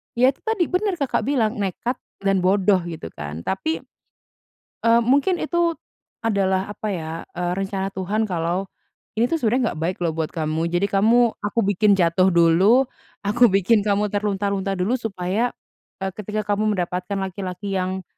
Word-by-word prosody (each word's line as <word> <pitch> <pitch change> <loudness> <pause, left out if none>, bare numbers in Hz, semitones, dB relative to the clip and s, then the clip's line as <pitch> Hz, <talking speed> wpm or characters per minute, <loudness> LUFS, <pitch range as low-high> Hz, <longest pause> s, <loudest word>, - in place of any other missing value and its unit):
ya 255 +2 +5
itu - - -28
tadi, 440 -5 +1
bener 380 +1 0
Kakak 265 -5 0
bilang, 240 -5 +1
"Nekat 205 +6 -2 0.3
dan 195 -1 +2
bodoh," 190 +1 +3
gitu 160 - -6
kan. 75 +2 -6
Tapi, 315 +13 -1 1.1
eee, 230 +1 +5
mungkin 280 +9 +2
itu 345 +1 +1 0.5
adalah 195 -4 +1
apa 210 +1 -5
ya, 160 -4 -4 0.2
eee, 175 0 -2
rencana 195 0 -2
Tuhan 205 +4 -1
kalau, 175 +2 -1 0.5
"Ini 230 - +4
tuh 325 -2 0
sebenernya 240 +1 +2
nggak 155 - -8
baik 185 - -2
loh 165 -2 0
buat 160 -1 -2
kamu. 160 0 -1
Jadi 175 +3 +1
kamu, 230 +4 +4
aku 205 +3 -1
bikin 205 +1 +3
jatuh 175 +1 +3
dulu, 185 +9 +5 0.4
aku 235 +4 +5
bikin 200 +3 +3
kamu 205 +1 +1
terlunta-lunta 200 -1 -1
dulu, 185 +6 0
supaya, 205 +2 -1 0.5
eee, 190 - -1
ketika 210 +2 -3
kamu 215 +1 +1
mendapatkan 180 +2 -2
laki-laki 190 0 -4
yang 185 0 -2
200 Hz, 160 wpm, -22 LUFS, 185-230 Hz, 1.1 s, ya